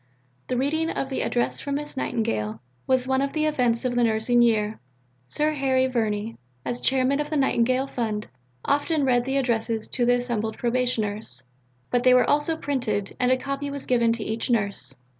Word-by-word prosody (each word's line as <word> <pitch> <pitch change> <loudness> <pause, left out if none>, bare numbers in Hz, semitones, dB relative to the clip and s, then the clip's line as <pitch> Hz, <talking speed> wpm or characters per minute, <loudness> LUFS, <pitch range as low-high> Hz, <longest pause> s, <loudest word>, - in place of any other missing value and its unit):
'" 125 0 -40
The 250 - -1
reading 315 +5 0
of 270 - -3
the 265 - -1
"Address 240 -1 -1
from 280 -1 -3
Miss 295 +1 -5
Nightingale" 110 - -2 0.3
was 260 -1 +2
one 265 0 +2
of 275 0 -1
the 310 0 +1
events 250 -5 +1
of 250 - 0
the 245 0 +2
nursing 230 +2 +3
year. 220 -2 +2 0.5
Sir 300 - 0
Harry 265 -3 +1
Verney, 225 -3 -2 0.3
as 245 - -2
chairman 265 +2 +2
of 295 - -2
the 310 - -1
Nightingale 255 -1 +2
Fund, 220 -5 -3 0.4
often 290 +1 +1
read 245 -2 +2
the 265 +1 0
addresses 230 -4 0
to 245 - 0
the 245 +1 +4
assembled 235 -3 -2
Probationers, 220 - -1 0.5
but 245 - +2
they 255 0 +6
were 250 - +4
also 295 +2 +2
printed, 235 -10 -2
and 250 0 +2
a 255 - +4
copy 275 +2 -4
was 280 -1 -5
given 235 -2 +3
to 230 -2 -4
each 220 +3 -2
nurse. 200 - 0
245 Hz, 190 wpm, -25 LUFS, 225-270 Hz, 0.5 s, they